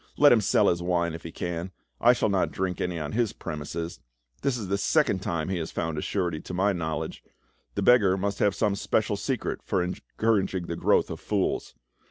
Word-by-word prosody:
Let 145 0 +7
him 115 - +5
sell - - +3
his 85 0 +2
wine 85 -1 0
if 80 - -7
he 85 - -8
can; 85 +2 -4 0.3
I 120 +1 +6
shall 115 - +1
not 95 -2 +2
drink 95 -1 -2
any 90 -1 -1
on 75 -2 -4
his 115 -2 0
premises. 80 +1 -5 0.4
This 135 -3 +1
is 105 -5 -5
the 100 - +1
second 145 -3 +2
time 85 -3 -2
he 95 -2 -1
has 80 - -4
found 80 -1 -2
a - - -3
surety 85 -6 -1
to 90 - -6
my 100 +2 +2
knowledge; 80 -4 -3 0.5
the - - 0
beggar 105 -6 +5
must 100 +1 -2
have 100 -2 +3
some 105 -3 +1
special 105 +1 0
secret 125 +4 -2
for 95 -4 0
encouraging 95 0 -1
the 85 - -4
growth - - +2
of - - -5
fools. 100 -3 -1
95 Hz, 210 wpm, -27 LUFS, 85-105 Hz, 0.5 s, Let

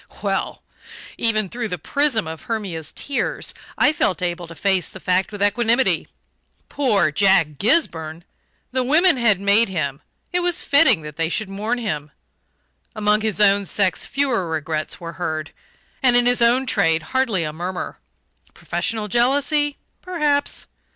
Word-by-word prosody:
Well! - - -2 0.6
even 215 -3 +1
through 235 +4 -4
the 180 - -4
prism 270 - 0
of 160 -1 -8
Hermia's 185 -9 -4
tears 280 -2 -2 0.2
I 295 - +4
felt 195 -10 0
able 175 -1 -3
to 165 - -11
face 190 +2 0
the 190 - -11
fact 185 +1 0
with 205 -1 -3
equanimity. 235 +5 +2 0.6
Poor 205 - +2
Jack 165 -4 +2
Gisburn! 170 - 0 0.5
The 260 0 0
women 315 +4 +4
had 220 -6 +3
made 200 +3 +3
him 145 -5 -3 0.3
it 355 - +2
was 355 0 0
fitting 255 - +4
that 150 -1 -9
they 165 -1 0
should 210 +3 -2
mourn 215 +5 -2
him. 150 -11 -4 0.9
Among 210 0 +2
his 215 -2 -2
own 200 -1 +4
sex 195 -1 +1
fewer 255 -11 -1
regrets 155 -1 -3
were 170 -1 -7
heard, 155 -2 -3 0.5
and 255 -3 +4
in 245 0 +4
his 245 0 +3
own 245 +3 +4
trade 165 -9 +1
hardly 240 -9 +1
a 150 -1 -4
murmur. 180 +3 -5 0.6
Professional 220 -2 -3
jealousy? 285 +6 +1 0.2
Perhaps. 300 -6 0
205 Hz, 150 wpm, -21 LUFS, 170-250 Hz, 0.9 s, I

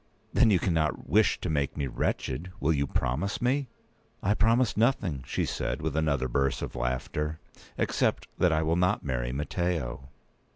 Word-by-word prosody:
"Then - - +5
you 100 - +5
cannot 80 -4 0
wish - - +3
to - - -2
make 70 -3 -1
me 70 - 0
wretched! 65 +5 -2
Will 75 +4 +2
you 70 -1 0
promise 65 +11 -1
me?" 130 +3 +1 0.6
"I 100 - +3
promise 115 +2 +3
nothing," 100 - +1
said - - -1
she, - - -9
with 80 -2 -1
another 70 -5 +1
burst 70 +2 0
of - - -5
laughter; 65 +6 -2 0.4
"except - - 0
that 90 - +4
I 80 0 +2
will 80 +1 +1
not 90 +1 +2
marry 60 -3 -1
Matteo!" 70 -2 -2
80 Hz, 165 wpm, -28 LUFS, 65-90 Hz, 0.6 s, Then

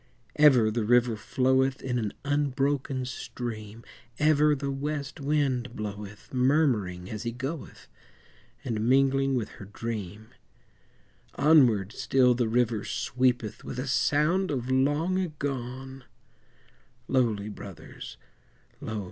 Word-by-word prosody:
Ever 130 -8 +6
the 115 0 -1
river 120 +1 +3
floweth 130 +3 +1
In 125 -2 -1
an 105 -3 -2
unbroken 140 -2 0
stream, 115 -3 -6 0.3
Ever 150 0 +4
the 140 0 -3
west 145 +1 -4
wind 135 -4 0
bloweth, 105 0 -7
Murmuring 125 - +1
as 105 -1 -5
he 120 - -3
goeth, 135 +6 -6 0.8
And 115 -2 -1
mingling 135 0 +3
with 115 -4 -2
her - - -7
dream; 110 0 -6 1.1
Onward 125 -10 +4
still 125 0 +3
the 120 -1 0
river 115 -2 +1
sweepeth 125 -4 -1
With - - -6
a 130 - -2
sound 150 +9 +2
of 130 -3 -2
long 145 +8 +2
agone; 135 -5 -5 1.0
Lowly, 110 -6 +1
Brothers, 95 -10 -10 0.6
lo! 110 -1 -4
125 Hz, 115 wpm, -27 LUFS, 110-140 Hz, 1.1 s, Ever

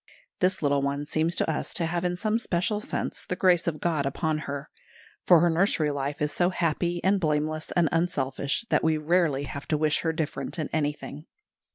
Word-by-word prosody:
This 185 -2 +1
little 140 -1 +2
one 140 +1 -2
seems 160 +3 0
to - - +1
us - - -2
to 170 - +3
have 170 +1 -2
in 180 0 0
some 215 +5 0
special 205 +1 0
sense - - -4
the 180 - -3
grace 180 -2 +3
of 155 -2 -1
God 155 -5 0
upon 155 +3 -1
her; 140 +1 -5 0.6
for 175 -3 +7
her 175 - +4
nursery 165 -3 +2
life 140 +1 -3
is 150 - 0
so 175 0 +2
happy 175 0 -1
and 195 +1 +3
blameless 155 -1 -1
and 175 -2 +3
unselfish, 140 - -1
that - - +3
we 160 -1 +2
rarely 155 -3 +1
have 140 0 -7
to 155 - +1
wish 155 0 +2
her 165 - 0
different 160 +2 -4
in 155 - -3
anything. 150 0 -3
160 Hz, 200 wpm, -27 LUFS, 150-175 Hz, 0.6 s, for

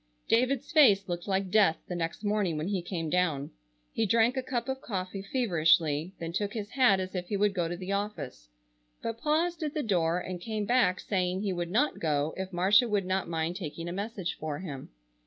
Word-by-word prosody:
David's 255 +2 +1
face 205 - +6
looked 175 +1 -4
like 190 -1 0
death 205 -7 +4
the - - -4
next 170 +3 -3
morning 205 -6 0
when 155 +5 -2
he 195 -3 0
came 170 -2 -4
down. 155 -5 0 0.4
He 225 - +1
drank 230 +4 +3
a 260 - 0
cup 250 -1 -3
of 265 0 -3
coffee 190 -5 -4
feverishly, 170 - +2
then 165 0 -5
took 205 +2 -1
his 210 -1 -5
hat 250 -7 +4
as 185 0 -4
if 180 -2 -3
he 205 - -1
would 205 0 +2
go 175 -3 0
to 175 +1 -4
the 185 +1 -5
office, 200 - -4 0.5
but 230 0 -3
paused 330 +3 +1
at 305 0 -3
the 305 - 0
door 175 -5 +1
and 180 -1 -6
came 215 0 -3
back 220 -5 +3
saying 185 -1 -1
he 195 -2 0
would 175 -1 -3
not 240 +11 +1
go 150 -1 0
if 190 0 -5
Marcia 200 +7 +4
would 205 -3 +1
not 185 -1 -1
mind 165 +1 -1
taking 165 -1 -6
a - - -3
message 200 -2 -3
for 150 -2 -3
him. 145 -7 -7
190 Hz, 210 wpm, -29 LUFS, 175-220 Hz, 0.5 s, face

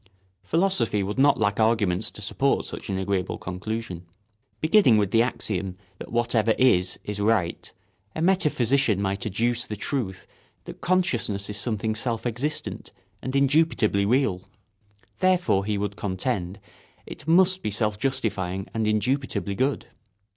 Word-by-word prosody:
Philosophy 125 - +1
would 105 +6 -3
not 140 +1 +4
lack 100 -1 +1
arguments 110 -4 +2
to 105 - -10
support 135 +6 0
such - - -6
an 95 - -1
agreeable 95 -1 -1
conclusion. 90 -1 -5 0.5
Beginning 155 - +5
with 100 -2 +1
the 115 - +4
axiom 95 -6 -2 0.2
that - - -9
whatever 115 -2 +2
is 95 -8 +3
is 105 0 -5
right, 105 -5 0 0.4
a - - -3
metaphysician 140 - +2
might 100 +3 -2
adduce 115 +4 0
the 105 - -4
truth 105 -4 -3 0.4
that - - -10
consciousness 175 - 0
is 105 - -3
something 110 0 -1
self 115 +1 -3
existent 125 +6 -3 0.3
and 130 +1 -4
indubitably 140 -8 +2
real; 115 -6 +2 0.8
therefore, 180 - +2
he 105 -1 -1
would 100 0 -3
contend, 95 0 -3 0.5
it - - -10
must 185 +3 +4
be - - -2
self 105 0 -1
justifying 95 -7 -2
and 110 -1 0
indubitably 110 0 0
good. 130 +7 0
110 Hz, 140 wpm, -25 LUFS, 100-135 Hz, 0.8 s, Beginning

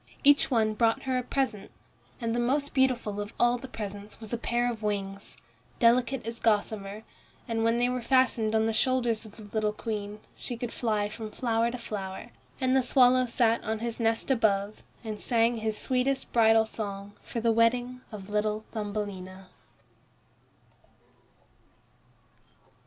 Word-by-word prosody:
Each 285 0 +5
one 220 -3 +2
brought 225 +1 +2
her 260 -1 0
a - - -1
present, 250 -5 -2 0.5
and 230 -2 -1
the 240 - 0
most 280 +4 0
beautiful 250 -6 +1
of 205 +1 -7
all 240 0 +3
the 265 - -8
presents 205 -3 -7
was 220 0 -8
a - - +1
pair 240 +1 0
of 225 -2 -7
wings, 200 -5 -4 0.4
delicate 240 +1 +3
as 230 0 -5
gossamer. 210 -1 0 0.4
And 225 -1 -1
when 230 +1 +3
they 245 +1 +2
were 250 0 -1
fastened 235 -3 +2
on 220 0 +3
the 225 - 0
shoulders 240 -1 +1
of 210 - -13
the 220 - -10
little 210 +1 -1
Queen, 210 -1 -5 0.2
she 240 - -6
could 240 0 -5
fly 215 -3 0
from 215 +1 -7
flower 230 0 0
to 250 - -5
flower. 205 -1 -6 0.3
And 260 -1 +2
the 265 - +5
swallow 255 0 +4
sat 230 -1 +2
on 220 +1 -1
his 235 +1 -4
nest 225 +3 +1
above, 210 -4 +1 0.2
and 215 -2 -5
sang 235 -1 +2
his 220 -1 -2
sweetest 260 +1 -1
bridal 225 -1 +5
song 205 -2 -5
for 235 - -4
the 230 0 +2
wedding 245 +2 +2
of 200 -3 -8
little 210 +1 0
Thumbelina. 200 -3 -5
225 Hz, 160 wpm, -28 LUFS, 210-245 Hz, 0.5 s, Each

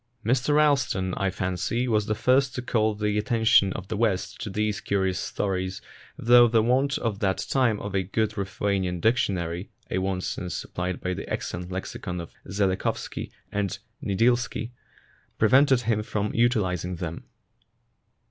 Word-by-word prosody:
Mr 130 +5 +2
Ralston, 135 -11 +2
I 100 - 0
fancy, 95 +7 -1
was 105 -3 +1
the 110 - 0
first 130 +4 +2
to 125 - -3
call 110 -3 +1
the 105 0 0
attention 110 -3 +4
of - - -7
the 110 - -3
West 105 -4 -1
to - - -4
these 105 0 -1
curious 95 -2 0
stories, 95 -1 -2 0.4
though 120 +1 +7
the 115 -1 +3
want 130 +4 +2
at 110 -4 -2
that 95 -2 0
time 125 -6 +2
of 100 - -6
a 95 - +2
good 105 +3 -1
Ruthenian 95 -2 -1
dictionary 90 -4 0 0.2
(a - - +1
want 95 -1 -1
since 90 -1 -4
supplied 90 0 -4
by 90 - -1
the - - -7
excellent 90 +1 -4
lexicon 90 -1 -4
of 85 - -8 0.2
Zhelekhovsky 95 -1 -1 0.2
and 100 -1 -1 0.3
Nidilsky) 120 +3 +1 0.7
pre 110 - +3
vented 135 0 +5
him 110 -2 0
from 105 -1 -2
utilizing 95 -7 +1
them. 85 -2 -6
105 Hz, 155 wpm, -26 LUFS, 95-115 Hz, 0.7 s, though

